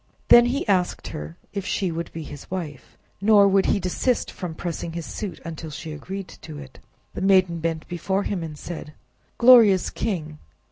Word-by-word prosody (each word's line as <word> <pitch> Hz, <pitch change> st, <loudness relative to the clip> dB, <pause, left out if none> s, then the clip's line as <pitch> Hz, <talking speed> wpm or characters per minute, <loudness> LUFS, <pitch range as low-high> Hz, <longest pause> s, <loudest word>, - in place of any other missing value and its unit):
Then 240 Hz, 0 st, +8 dB
he 260 Hz, +1 st, -1 dB
asked 185 Hz, -3 st, 0 dB
her 75 Hz, +2 st, -7 dB, 0.2 s
if 200 Hz, -1 st, -3 dB
she 190 Hz, -1 st, -1 dB
would 165 Hz, 0 st, -5 dB
be 160 Hz, -, -6 dB
his 145 Hz, -2 st, -10 dB
wife, 160 Hz, -7 st, -6 dB, 0.2 s
nor 205 Hz, -1 st, +6 dB
would 195 Hz, 0 st, +3 dB
he -, -, +2 dB
desist 195 Hz, +7 st, 0 dB
from 175 Hz, -4 st, -6 dB
pressing 170 Hz, 0 st, -4 dB
his 170 Hz, -1 st, -5 dB
suit, 200 Hz, -4 st, -6 dB
until 160 Hz, -1 st, -6 dB
she 155 Hz, +2 st, -7 dB
agreed 190 Hz, +5 st, -6 dB
to 155 Hz, -2 st, -9 dB
it. 135 Hz, -2 st, -11 dB, 0.3 s
The -, -, -5 dB
maiden 185 Hz, -3 st, +3 dB
bent 160 Hz, -1 st, -3 dB
before 190 Hz, +3 st, -1 dB
him 195 Hz, -4 st, -2 dB
and 155 Hz, -2 st, -6 dB
said— 155 Hz, -2 st, -7 dB, 0.4 s
"Glorious 235 Hz, -6 st, +7 dB
king! 155 Hz, -8 st, -3 dB
175 Hz, 180 wpm, -24 LUFS, 160-195 Hz, 0.4 s, Then